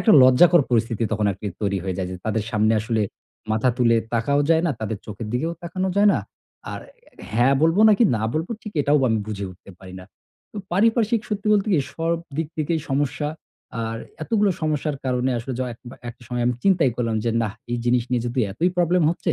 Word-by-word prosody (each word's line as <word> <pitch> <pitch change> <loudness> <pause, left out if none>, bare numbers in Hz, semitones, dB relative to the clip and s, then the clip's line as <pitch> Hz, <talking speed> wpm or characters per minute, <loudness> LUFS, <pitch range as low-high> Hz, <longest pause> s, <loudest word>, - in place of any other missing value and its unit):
একটা 220 - +4
লজ্জাকর 155 +6 +6
পরিস্থিতি 115 -1 +1
তখন 105 0 0
আরকি 100 +2 -6
তৈরি 100 -2 0
হয়ে 95 -2 -3
যায় 90 - -2
যে 90 - -5
তাদের 110 -1 0
সামনে 110 0 +2
আসলে 110 0 0 0.5
মাথা 110 +4 +2
তুলে 120 -2 +4 0.2
তাকাও 140 +5 +2
যায় 165 0 +4
না, - - +1
তাদের 110 -1 -3
চোখের 110 +1 -6
দিকেও 155 +7 -1
তাকানো 185 +2 -2
যায় 205 +1 +5
না। - - +1 0.5
আর - - -6 0.5
হ্যাঁ 125 +4 +4
বলবো 165 +6 +4
নাকি 215 +3 +4
না 110 - -3
বলবো 160 +6 -2
ঠিক 210 - -8
এটাও 145 +1 +3
আমি 110 -1 +1
বুঝে 100 -2 -4
উঠতে 90 +2 -15
পারি 95 -1 -12
না। 90 - -11 0.7
পারিপার্শ্বিক 225 +2 +2
সত্যি 210 -1 -3
বলতে 205 0 +2
কি 160 - +4 0.2
সব 165 +1 0 0.2
দিক 160 - -1
থেকেই 155 +1 -1
সমস্যা, 145 +2 0 0.6
আর 115 0 -3 0.3
এতগুলো 210 +2 +2
সমস্যার 150 -1 -1
কারণে 125 0 0
আসলে 120 +3 -5
য - - -2
এক 115 - -14 0.3
একটা 120 +1 -10
সময় 120 -1 -2
আমি 125 - +1
চিন্তাই 175 -9 +3
করলাম 115 -2 -1
যে 115 - +1
নাহ 105 - -2 0.2
এই 120 - -1
জিনিস 120 0 +2
নিয়ে 120 -2 +1
যদি 120 +2 -1
এতই 170 - +1
প্রবলেম 175 0 +3
হচ্ছে, 170 0 -1
130 Hz, 200 wpm, -23 LUFS, 115-170 Hz, 0.7 s, লজ্জাকর